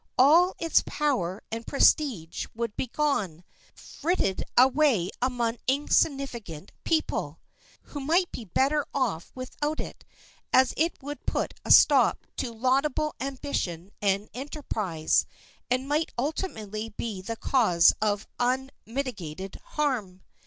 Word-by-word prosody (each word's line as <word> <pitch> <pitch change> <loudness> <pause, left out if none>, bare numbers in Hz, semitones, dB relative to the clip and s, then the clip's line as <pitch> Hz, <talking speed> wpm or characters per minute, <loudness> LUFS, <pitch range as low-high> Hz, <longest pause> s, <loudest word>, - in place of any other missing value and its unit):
All 330 +8 +6
its 330 -1 +3
power 205 - -1
and 225 +1 -5
prestige 260 - +2
would 230 -2 -3
be - - -2
gone, 215 - -1 0.3
frittered 305 - -1
away 255 - +4
among 245 -2 0
insignificant 265 - 0
people, 320 -1 -1 0.4
who 290 - -8
might 330 +6 +1
be 235 - -7
better 275 - +1
off 215 - -1
without 295 +4 -3
it, - - -7 0.5
as 260 0 +5
it 330 +3 0
would 290 +1 -7
put - - -1
a - - -8
stop - - +6
to 240 - -2
laudable 265 +6 +1
ambition 250 - -3
and 200 +1 +1
enterprise, 220 - -1 0.4
and 255 +2 0
might 300 +3 0
ultimately 225 - -3
be 210 -2 -5
the 230 +5 -4
cause 195 -12 +4
of 210 -1 0
unmitigated 245 - -3
harm. 225 -11 -2
255 Hz, 115 wpm, -27 LUFS, 205-290 Hz, 0.5 s, All